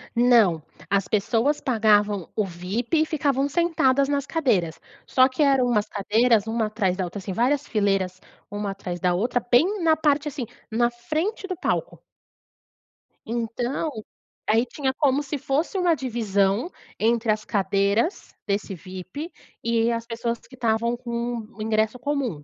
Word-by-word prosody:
Não, 230 Hz, -9 st, +4 dB, 0.3 s
as 200 Hz, -2 st, +1 dB
pessoas 230 Hz, +7 st, +1 dB
pagavam 210 Hz, -, +2 dB
o 215 Hz, -, +2 dB
VIP 195 Hz, -, -1 dB
e -, -, -2 dB
ficavam 280 Hz, -3 st, 0 dB
sentadas 280 Hz, -4 st, +2 dB
nas 280 Hz, -1 st, 0 dB
cadeiras. 185 Hz, -, 0 dB, 0.3 s
Só 255 Hz, 0 st, +5 dB
que 265 Hz, +3 st, 0 dB
eram 270 Hz, -3 st, +4 dB
umas 210 Hz, -3 st, +1 dB
cadeiras 220 Hz, +2 st, +2 dB
uma 225 Hz, 0 st, 0 dB
atrás 205 Hz, -4 st, -1 dB
da 190 Hz, -, -1 dB
outra, 180 Hz, +3 st, -5 dB
assim, 190 Hz, 0 st, -5 dB
várias 265 Hz, +7 st, +1 dB
fileiras 195 Hz, -4 st, 0 dB, 0.3 s
uma 205 Hz, 0 st, -3 dB
atrás 180 Hz, -3 st, -6 dB
da 180 Hz, +1 st, +2 dB
outra 235 Hz, +7 st, +1 dB
bem 355 Hz, +10 st, +3 dB
na 320 Hz, -1 st, +5 dB
parte, 300 Hz, -1 st, +1 dB
assim, 280 Hz, -4 st, -4 dB, 0.3 s
na 235 Hz, +2 st, +2 dB
frente 310 Hz, -, -3 dB
do 370 Hz, -, -3 dB
palco. 370 Hz, -, -2 dB, 1.3 s
Então, 240 Hz, +6 st, -2 dB, 0.6 s
aí, 225 Hz, +3 st, +4 dB
tinha 265 Hz, +1 st, -2 dB
como 280 Hz, -1 st, +2 dB
se 290 Hz, +1 st, -4 dB
fosse 290 Hz, +9 st, -1 dB
uma 355 Hz, -3 st, +3 dB
divisão 225 Hz, -, 0 dB, 0.3 s
entre 230 Hz, 0 st, +2 dB
as 215 Hz, 0 st, -2 dB
cadeiras 200 Hz, -, 0 dB
desse 200 Hz, 0 st, -1 dB
VIP 185 Hz, -, -8 dB, 0.3 s
e 230 Hz, 0 st, +2 dB
as 230 Hz, 0 st, -2 dB
pessoas 235 Hz, 0 st, -3 dB
que 260 Hz, -, -16 dB
estavam 235 Hz, 0 st, 0 dB
com 235 Hz, 0 st, -3 dB
o 215 Hz, -, -10 dB
ingresso 220 Hz, +2 st, 0 dB
comum. 250 Hz, -, -2 dB
235 Hz, 150 wpm, -24 LUFS, 205-275 Hz, 1.3 s, Só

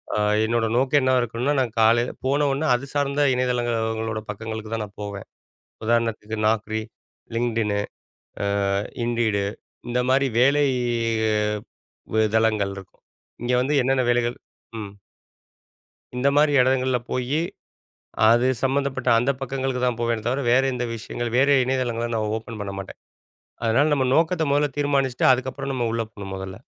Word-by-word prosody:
அ -, -, 0 dB, 0.3 s
என்னோட 115 Hz, 0 st, +1 dB
நோக்கம் 135 Hz, +2 st, +3 dB
என்ன 130 Hz, 0 st, +3 dB
இருக்கணும்னா, 120 Hz, +5 st, -1 dB
நான் 120 Hz, -3 st, -3 dB
காலையில 120 Hz, +2 st, +3 dB
போனவுடன 145 Hz, +1 st, +1 dB
அது 140 Hz, +3 st, -5 dB
சார்ந்த 145 Hz, 0 st, +2 dB
இணையதளங்களோட 115 Hz, -3 st, -1 dB
பக்கங்களுக்கு 110 Hz, +1 st, -5 dB
தான் 110 Hz, -1 st, -3 dB
நான் 100 Hz, -, -18 dB
போவேன். 100 Hz, -1 st, -7 dB, 0.6 s
உதாரணத்துக்கு 115 Hz, -2 st, 0 dB
Naukri, 110 Hz, 0 st, 0 dB, 0.5 s
LinkedInனு, 110 Hz, -4 st, 0 dB, 1.3 s
Indeed 115 Hz, -3 st, +1 dB, 0.5 s
இந்த 125 Hz, +1 st, 0 dB
மாதிரி 135 Hz, +1 st, +3 dB
வேலை 140 Hz, +3 st, +4 dB, 1.5 s
வ 110 Hz, -, +4 dB
தளங்கள் 110 Hz, -3 st, +2 dB
இருக்கும், 95 Hz, -1 st, -13 dB, 0.4 s
இங்க 125 Hz, +1 st, -1 dB
வந்து 145 Hz, +3 st, 0 dB
என்னென்ன 130 Hz, 0 st, +1 dB
வேலைகள் 120 Hz, 0 st, +1 dB, 0.4 s
ம். 100 Hz, -1 st, -7 dB, 1.2 s
இந்தமாரி 140 Hz, +3 st, +3 dB
எடங்கள்ல 130 Hz, -1 st, +2 dB
போயி, 130 Hz, +5 st, 0 dB, 0.9 s
அது 120 Hz, +2 st, +4 dB, 0.2 s
சம்மந்தப்பட்ட 135 Hz, -1 st, 0 dB
அந்த 125 Hz, +4 st, +2 dB
பக்கங்களுக்கு 135 Hz, -1 st, -2 dB
தான் 120 Hz, -2 st, 0 dB
போவேனே 115 Hz, -2 st, 0 dB
தவிர, 135 Hz, +3 st, 0 dB
வேற 130 Hz, +2 st, +5 dB
எந்த 125 Hz, -1 st, -2 dB
விஷயங்கள், 115 Hz, +1 st, -5 dB
வேற 140 Hz, +2 st, +4 dB, 0.2 s
இணையதளங்கள 120 Hz, -3 st, -1 dB
நான் 110 Hz, -1 st, -1 dB
ஓப்பன் 110 Hz, -1 st, -8 dB
பண்ண 100 Hz, -1 st, -5 dB
மாட்டேன். 95 Hz, -, -9 dB, 0.6 s
அதனால 140 Hz, +7 st, +3 dB
நம்ம 130 Hz, -3 st, +1 dB
நோக்கத்த 165 Hz, 0 st, +2 dB
முதல 145 Hz, 0 st, +2 dB
தீர்மானிச்சிட்டு 140 Hz, -3 st, +1 dB
அதுக்கப்பறம் 130 Hz, +2 st, -3 dB
நம்ம 120 Hz, -2 st, -1 dB
உள்ள 115 Hz, 0 st, -1 dB
போணும் 100 Hz, -2 st, -7 dB
முதல்ல. 95 Hz, 0 st, -6 dB
120 Hz, 135 wpm, -23 LUFS, 110-135 Hz, 1.5 s, வேற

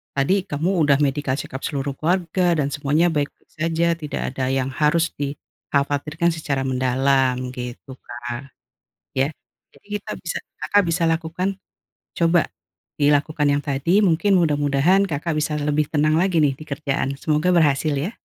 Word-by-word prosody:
tadi 140 Hz, +8 st, +2 dB
kamu 155 Hz, +5 st, -1 dB, 0.2 s
udah 140 Hz, -1 st, +5 dB
medical 140 Hz, -1 st, 0 dB
check -, -, -6 dB
up 135 Hz, -, -5 dB
seluruh 140 Hz, -1 st, -2 dB
keluarga 175 Hz, +1 st, +1 dB
dan 140 Hz, -1 st, 0 dB
semuanya 145 Hz, +4 st, +2 dB
baik-baik 145 Hz, -2 st, -4 dB
saja, 165 Hz, +1 st, +1 dB, 0.2 s
tidak 150 Hz, -1 st, -4 dB
ada 130 Hz, -1 st, -2 dB
yang 135 Hz, 0 st, 0 dB
harus 155 Hz, +4 st, +2 dB
dikhawatirkan 145 Hz, +3 st, -2 dB
secara 145 Hz, -4 st, -2 dB
mendalam, 130 Hz, 0 st, +1 dB
gitu 125 Hz, +1 st, -7 dB
Kak. 120 Hz, +2 st, -7 dB, 0.6 s
Ya, 135 Hz, -, +3 dB, 0.5 s
jadi -, -, -23 dB
kita -, -, -8 dB
bisa 170 Hz, -, -3 dB, 0.3 s
Kakak 205 Hz, +6 st, +3 dB
bisa 165 Hz, +1 st, 0 dB
lakukan, 180 Hz, +4 st, -2 dB, 0.6 s
coba, 170 Hz, 0 st, +4 dB, 0.6 s
dilakukan 145 Hz, +1 st, +2 dB
yang 145 Hz, 0 st, +1 dB
tadi, 155 Hz, +8 st, +2 dB
mungkin 190 Hz, +3 st, +2 dB
mudah-mudahan 150 Hz, +4 st, +3 dB
Kakak 155 Hz, 0 st, -2 dB
bisa 150 Hz, 0 st, -1 dB
lebih 150 Hz, 0 st, 0 dB
tenang 155 Hz, +1 st, +2 dB
lagi 175 Hz, -4 st, +2 dB
nih 140 Hz, -, +3 dB
di 155 Hz, -, -9 dB
kerjaan, 140 Hz, -1 st, -2 dB
semoga 155 Hz, +4 st, 0 dB
berhasil 150 Hz, -2 st, +3 dB
ya! 165 Hz, +11 st, -3 dB
150 Hz, 145 wpm, -22 LUFS, 140-165 Hz, 0.6 s, udah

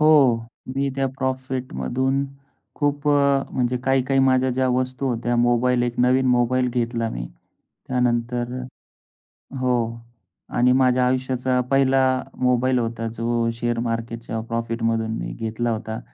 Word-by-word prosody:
हो, 150 Hz, -6 st, +6 dB, 0.4 s
मी 140 Hz, 0 st, +1 dB
त्या 135 Hz, 0 st, +1 dB
प्रॉफिटमधून 130 Hz, -, -1 dB, 0.5 s
खूप 145 Hz, 0 st, 0 dB
अ, 140 Hz, -1 st, +3 dB
म्हणजे 125 Hz, -1 st, 0 dB
काही-काही 135 Hz, 0 st, +2 dB
माझ्या 130 Hz, -1 st, +3 dB
ज्या 130 Hz, +1 st, +1 dB
वस्तू 130 Hz, +1 st, -1 dB
होत्या, 120 Hz, 0 st, -1 dB
मोबाईल 120 Hz, +1 st, +2 dB
एक 120 Hz, 0 st, -2 dB
नवीन 130 Hz, +1 st, +3 dB
मोबाईल 125 Hz, 0 st, +2 dB
घेतला 115 Hz, -1 st, -1 dB
मी. -, -, -5 dB, 0.6 s
त्यानंतर 120 Hz, -1 st, 0 dB, 1.1 s
हो 130 Hz, 0 st, +1 dB, 0.8 s
आणि 125 Hz, +1 st, +4 dB
माझ्या 125 Hz, -1 st, +3 dB
आयुष्याचा 130 Hz, 0 st, 0 dB
पहिला 135 Hz, -1 st, +4 dB, 0.4 s
मोबाईल 125 Hz, 0 st, +2 dB
होता, 115 Hz, -1 st, -2 dB
जो 115 Hz, 0 st, 0 dB
शेअर 120 Hz, 0 st, -2 dB
मार्केटच्या 115 Hz, 0 st, -3 dB
प्रॉफिटमधून 115 Hz, -1 st, -1 dB
मी -, -, -4 dB
घेतला 115 Hz, +1 st, -2 dB
होता. 110 Hz, 0 st, -4 dB
125 Hz, 125 wpm, -23 LUFS, 115-130 Hz, 1.1 s, हो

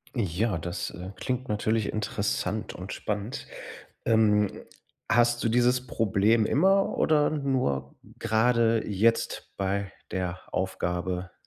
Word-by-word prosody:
Ja, 100 Hz, -3 st, 0 dB
das, 85 Hz, +3 st, -4 dB
äh, 90 Hz, +2 st, -8 dB
klingt 130 Hz, +2 st, -3 dB
natürlich 110 Hz, +1 st, 0 dB
interessant 105 Hz, 0 st, -2 dB
und 90 Hz, +3 st, -6 dB
spannend. 105 Hz, +2 st, -4 dB, 0.6 s
Ähm, 105 Hz, -2 st, +3 dB, 0.5 s
hast 120 Hz, 0 st, +3 dB
du 115 Hz, -, +2 dB
dieses 125 Hz, +1 st, +2 dB
Problem 110 Hz, 0 st, +2 dB
immer 195 Hz, +6 st, +3 dB
oder 150 Hz, -2 st, +3 dB
nur 125 Hz, -, -1 dB, 0.2 s
grade 115 Hz, 0 st, +2 dB
jetzt 110 Hz, +3 st, +1 dB
bei 100 Hz, 0 st, -1 dB, 0.2 s
der 90 Hz, 0 st, -2 dB
Aufgabe? 90 Hz, -1 st, -2 dB
110 Hz, 110 wpm, -27 LUFS, 95-120 Hz, 0.6 s, Ähm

